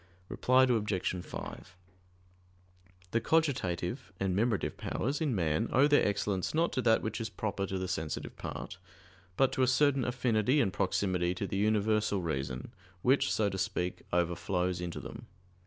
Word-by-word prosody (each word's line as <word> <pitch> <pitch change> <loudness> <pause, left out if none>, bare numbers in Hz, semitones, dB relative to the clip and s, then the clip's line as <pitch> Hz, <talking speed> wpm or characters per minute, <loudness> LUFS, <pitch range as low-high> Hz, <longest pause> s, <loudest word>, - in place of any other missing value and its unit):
Reply 130 +1 +4
Obj. 105 -7 0
5: 95 +1 -8 1.4
The 115 - +1
cogitative 125 - +1 0.2
and 95 -2 0
memorative 110 0 0
powers 140 +6 -2
in 145 -7 +1
man 80 -4 0
owe 135 +3 +5
their 145 0 +4
excellence 100 +2 -1
not 165 +2 +2
to 130 - 0
that 115 -2 +3
which 110 - -3
is 110 - -3
proper 100 -2 -3
to 95 - -3
the 95 0 -3
sensitive 80 -5 -4
part; - - -6 0.6
but 135 -1 +4
to 130 - -1
a 130 - +4
certain 135 +1 +3
affinity 125 +1 +2
and 95 -9 +2
proximity 95 -2 0
to 100 - -3
the 95 - -3
universal 105 0 +2
reason, 65 -7 -3 0.3
which, 135 +2 +3
so 110 - +2
to 95 -1 -3
speak, 90 -1 -2
overflows 90 +1 0
into 85 -1 -4
them. 115 +1 -9
105 Hz, 155 wpm, -31 LUFS, 90-125 Hz, 1.4 s, owe